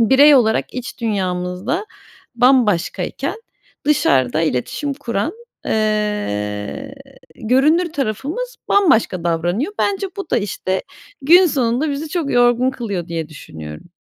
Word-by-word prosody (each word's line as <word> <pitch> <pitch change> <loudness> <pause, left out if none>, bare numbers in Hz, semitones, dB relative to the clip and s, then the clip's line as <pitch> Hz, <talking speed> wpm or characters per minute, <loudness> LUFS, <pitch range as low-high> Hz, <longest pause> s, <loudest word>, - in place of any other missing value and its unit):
birey 275 +6 +6
olarak 225 -3 +2
iç 255 0 -6
dünyamızda 190 - -2 0.5
bambaşkayken 240 -8 +1 0.5
dışarıda 140 - +2
iletişim 165 - -2
kuran, 235 -1 -2 0.3
eee, 210 - -2 0.4
görünür 300 +9 +2
tarafımız 295 - -3
bambaşka 225 - +3
davranıyor. 175 - 0
Bence 395 -1 0
bu 390 -4 -6
da, - - +3
işte, 190 -2 -2 0.4
gün 350 +7 +7
sonunda 265 0 0
bizi 290 +3 -4
çok 310 -3 -2
yorgun 245 +1 +3
kılıyor 205 -9 -4
diye 165 -2 -4
düşünüyorum. 80 - -10
235 Hz, 105 wpm, -19 LUFS, 180-285 Hz, 0.5 s, gün